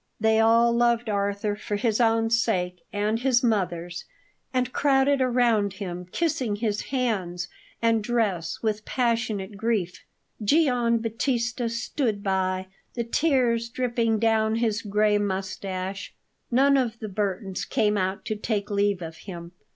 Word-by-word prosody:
They 220 0 +3
all 230 +1 +5
loved 235 -1 +2
Arthur 200 +1 -1
for 210 0 -4
his 225 +1 +1
own 225 -1 +2
sake 180 -7 0
and 210 +2 0
his 250 -1 +2
mother's, 175 -6 -1 0.5
and 255 -1 -1
crowded 275 -1 +3
round 235 -5 +2
him, 180 -3 -6
kissing 265 -10 0
his 210 -1 -1
hands 190 -9 -2 0.3
and 225 -2 +3
dress 210 -8 0
with 215 -1 -1
passionate 230 -5 -1
grief. 195 -5 -1 0.4
Gian 245 -2 +3
Battista 235 +1 -1
stood 230 -2 -2
by, 190 -1 0 0.3
the 235 - -1
tears 235 -3 +1
dripping 235 -2 0
down 220 0 +2
his 225 -2 0
gray 210 0 +2
moustache. 190 -1 -4 0.3
None 275 +3 +4
of 235 -4 0
the 220 - -6
Burtons 195 -1 -2
came 210 -1 +1
out 190 0 -1
to 215 - -2
take 210 -1 -2
leave 200 -2 +1
of 160 0 -7
him. 170 -3 -9
220 Hz, 135 wpm, -25 LUFS, 200-235 Hz, 0.5 s, all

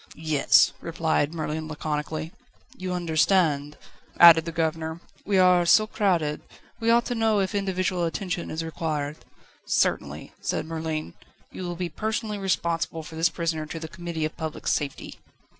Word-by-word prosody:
"Yes," 155 -3 +4
replied 160 -3 0
Merlin 155 -1 -4
laconically. 155 +1 -4 0.4
"You 185 0 -5
understand," 160 -3 +1 0.4
added 165 -2 +9
the 165 - -4
governor; 160 0 -2 0.3
"we 200 -1 +2
are 180 -1 +5
so 215 +5 +5
crowded. 175 -9 0 0.4
We 225 0 0
ought 235 +1 +4
to - - -2
know 225 -2 +2
if 195 +1 -1
individual 185 -3 0
attention 175 +2 -3
is 160 +1 -3
required." 155 -2 -3 0.5
"Certainly," - - 0
said - - -2
Merlin, 160 - -4 0.4
"you - - -8
will 175 0 -4
be 180 0 -3
personally 215 +2 -3
responsible 170 -4 -1
for 160 +1 -10
this 165 +2 +3
prisoner 160 -3 -2
to 165 - -6
the 160 - -6
Committee 170 -2 -4
of 155 - -5
Public 160 -1 -6
Safety." 145 -3 -2
165 Hz, 150 wpm, -25 LUFS, 155-185 Hz, 0.5 s, added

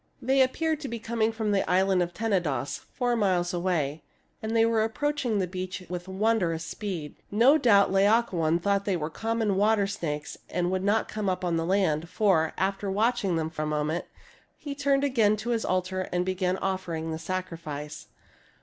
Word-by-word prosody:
They 265 0 +2
appeared 315 +4 +1
to 295 - -5
be 235 - -4
coming 225 0 0
from 220 -1 -2
the 200 -1 +3
island 190 0 +3
of 175 0 -1
Tenedos, 175 -10 -1
four 245 -2 0
miles 185 -5 +1
away, 165 -4 -1 0.4
and 220 +1 -3
they 225 0 +5
were 230 -1 +2
approach 290 +7 -1
ing 220 -3 +1
the 190 - +1
beach 185 +1 -5
with 180 0 -5
wondrous 190 -5 0
speed. 175 -7 -5
No 250 +9 +5
doubt 205 -8 +5
Laocobn 195 -5 +3
thought 200 0 +1
they 195 -3 +1
were 155 0 -4
common 225 0 -1
water 210 0 +3
snakes 150 -6 -4
and 180 0 -1
would 185 0 -1
not 210 +2 +2
come 210 -2 -2
upon 180 -2 -1
the 165 0 -1
land; 170 -4 +1
for, 180 -8 +2
after 195 +1 -1
watching 200 -2 +1
them 160 -1 -2
a 155 - 0
moment, 150 +2 -1 0.5
he 285 - -6
turned 280 -1 +1
again 225 -7 +3
to 225 +3 -3
his 230 -2 0
altar 185 0 -1
and 180 0 0
began 185 0 0
offering 175 -4 -3
the 160 - -4
sacrifice. 160 -4 -5
190 Hz, 180 wpm, -27 LUFS, 175-220 Hz, 0.5 s, they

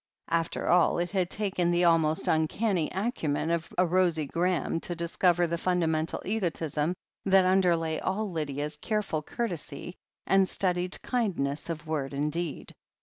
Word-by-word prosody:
After 165 -1 0
all 175 0 +4
it 175 0 -1
had 185 -3 0
taken 190 -5 0
the 175 0 +2
almost 160 -2 +3
uncanny 165 +3 +1
acumen 175 - -1
of 170 -1 -1
a 180 - +4
Rosie 175 -3 +2
Graham 170 +2 0
to 175 - -3
discover 175 +1 +2
the 170 0 -2
fundamental 165 -3 0
egotism 170 -5 -1 0.3
that 190 -1 +5
underlay 175 -4 +2
all 200 +2 -2
Lydia's 150 -2 -3
careful 210 -4 -1
courtesy 175 - -4 0.3
and 195 -1 +3
studied 180 -1 0
kindness 175 - -1
of 165 0 -4
word 145 -3 -2
and 150 +2 0
deed. 170 -2 -4
170 Hz, 145 wpm, -28 LUFS, 160-185 Hz, 0.3 s, that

